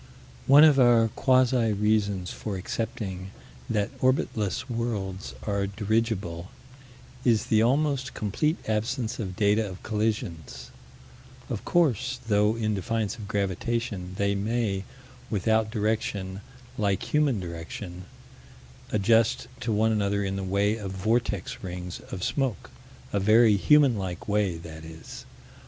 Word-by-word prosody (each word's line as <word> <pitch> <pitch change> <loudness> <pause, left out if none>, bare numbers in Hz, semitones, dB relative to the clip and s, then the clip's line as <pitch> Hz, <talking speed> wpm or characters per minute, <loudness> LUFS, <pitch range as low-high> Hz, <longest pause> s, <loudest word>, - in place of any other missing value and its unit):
One 140 +3 +8
of 150 -3 +6
our 120 -2 +5
quasi 130 -2 +3
reasons 100 -3 0
for 105 -3 -5
accepting 95 -1 -4 0.4
that 105 -2 -1
orbitless 130 -5 0
worlds 100 - -3
are 100 -1 0
dirigible 100 -4 -1 0.7
is 115 -3 +3
the 110 - +5
almost 135 +2 +1
complete 150 - 0
absence 115 +2 -1
of 95 -5 -4
data 105 +1 +2
of 95 - -10
collisions: 85 - -3 0.8
of - - -3
course, 130 - +2
though 105 0 +3
in 110 -2 -1
defiance 110 +1 -2
of 105 -3 -8
gravitation, 100 -1 -2
they 100 0 +1
may, 100 -1 -1 0.4
without 110 +2 +1
direction 105 -3 -2 0.4
like 100 -2 -1
human 145 -7 +3
direction, 90 +1 -7 0.9
adjust 110 +2 +2
to 115 - -2
one 110 +1 +2
another 100 -1 +1
in 95 0 -2
the 95 - -3
way 100 +3 +1
of 100 -3 -5
vortex 105 0 -1
rings 90 -2 -6
of 90 - -5
smoke 135 -6 -2 0.4
a 100 - +2
very 110 +2 +5
human 140 +3 +5
like 90 -3 -5
way, 100 -4 +1
that 80 -1 -10
is. 80 0 -10
105 Hz, 125 wpm, -27 LUFS, 95-115 Hz, 0.9 s, One